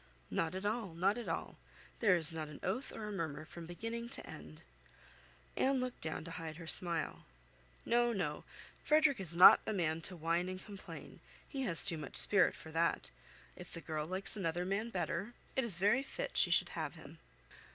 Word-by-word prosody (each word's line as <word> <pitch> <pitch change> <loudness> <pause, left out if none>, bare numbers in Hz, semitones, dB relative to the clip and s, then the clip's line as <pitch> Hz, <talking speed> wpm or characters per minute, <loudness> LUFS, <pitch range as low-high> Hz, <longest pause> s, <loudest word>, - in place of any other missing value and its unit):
"Not 165 +2 0
at 190 +2 -4
all, 210 -5 -2
not 195 +7 +2
at 235 - -5
all; - - -3 0.4
there 205 -6 +5
is 165 -2 -1
not 160 -1 -4
an 150 -1 -10
oath 235 +9 -2
or 215 - -6
a - - -4
murmur 155 -5 -3
from 165 +1 -9
beginning 230 +6 -5
to 275 - -4
end." 75 +1 -11 0.9
Anne 270 0 +2
looked 255 -1 -4
down 155 -1 -3
to 165 - -8
hide 165 -2 -6
her 165 +1 -9
smile. 170 -1 0 0.6
"No, 240 0 +3
no; 150 -9 -2 0.4
Frederick 300 -4 +4
is 170 -3 -1
not 180 - +10
a 220 - 0
man 165 -4 0
to 185 - -3
whine 170 +2 0
and 185 0 -7
complain; 200 -2 -10 0.3
he 275 - -4
has 165 - +1
too 170 -5 0
much 150 - -7
spirit 205 -2 +5
for 160 - -11
that. 165 +1 0 0.4
If 180 -1 -11
the 170 - -6
girl 155 -2 -3
likes 185 +1 0
another 175 -3 -1
man 200 +5 -1
better, 190 +3 -3 0.2
it 265 - +2
is 215 -8 +4
very 205 +8 +4
fit 275 - -5
she - - +4
should - - +4
have - - -4
him." - - -12
180 Hz, 195 wpm, -35 LUFS, 165-215 Hz, 0.9 s, not